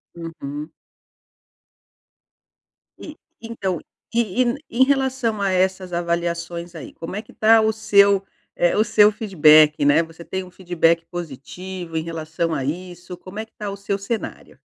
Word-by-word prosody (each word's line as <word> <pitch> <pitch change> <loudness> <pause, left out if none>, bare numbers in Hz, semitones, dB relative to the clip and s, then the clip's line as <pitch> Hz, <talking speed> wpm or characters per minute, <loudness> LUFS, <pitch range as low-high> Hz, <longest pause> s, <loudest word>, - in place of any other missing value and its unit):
Uhum. 155 -2 -7 2.3
E 310 - -10 0.3
então, 195 -7 -3 0.3
e 230 0 +1 0.3
e 235 - -8
em - - +9
relação 260 -5 0
a 195 - +1
essas 185 -1 0
avaliações 170 0 -3
aí, 155 - -9
como 165 +3 -7
é 210 - -3
que - - -18
tá 220 +1 +5
o 220 - +2
seu 200 -2 +4 0.3
eh, 175 - +2
o 215 - +4
seu 210 -1 +5
feedback? 155 -8 +5
Né, 145 +3 +5
você 165 +1 -12
tem 190 +2 -4
um 180 - -13
feedback 170 -2 +1
positivo 175 +2 -7
em 160 - -1
relação 165 0 -3
a 140 -4 -2
isso? 175 +4 -6
Como 185 +3 -9
é 220 - -4
que 220 - -38
tá 210 -1 -5
o 200 - -6
seu 200 0 -2
cenário? 215 +3 -6
180 Hz, 155 wpm, -22 LUFS, 165-210 Hz, 2.3 s, em